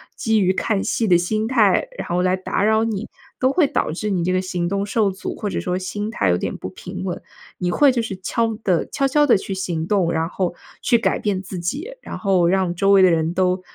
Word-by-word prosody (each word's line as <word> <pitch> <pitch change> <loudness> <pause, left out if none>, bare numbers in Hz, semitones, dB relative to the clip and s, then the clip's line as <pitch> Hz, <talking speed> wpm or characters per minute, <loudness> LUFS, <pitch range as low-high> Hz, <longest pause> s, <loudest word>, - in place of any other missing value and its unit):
基 220 -2 +1
于 185 -1 +3
看 195 +1 0
戏 225 - 0
的 180 - +5
心 215 +5 -1
态， 230 - +3
然 - - -4
后 175 +1 +1
来 185 0 +2
打 185 +1 -2
扰 220 +1 +3
你， 220 -2 -3 0.3
都 260 +1 +3
会 340 -1 +4
导 275 - -1
致 210 +5 -3
你 185 -4 0
这 185 - +1
个 185 - +1
行 180 -2 -2
动 200 +1 -1
受 205 0 +1
阻， 190 - -6
或 210 - -3
者 - - -2
说 180 0 -2
心 205 +3 -4
态 100 - 0
有 90 - +3
点 - - -3
不 - - -6
平 - - -8
稳。 - - -4 0.4
你 180 0 -1
会 280 +9 +5
就 240 - 0
是 220 -4 -4
悄 225 +3 0
地 180 -4 +1
悄 275 -2 +1
悄 295 +2 +3
地 250 - +5
去 195 - -5
行 175 -4 -3
动， 185 -4 +2
然 160 0 0
后 180 -1 -2 0.3
去 235 - +3
改 215 -4 +1
变 200 -3 -1
自 190 -1 -7
己， 275 - -3
然 - - -7
后 190 -4 +2
让 185 -1 +1
周 195 +3 +2
围 195 -1 +7
的 185 - +6
人 165 0 +1
都 185 0 +1
195 Hz, 265 characters per minute, -21 LUFS, 180-220 Hz, 0.4 s, 围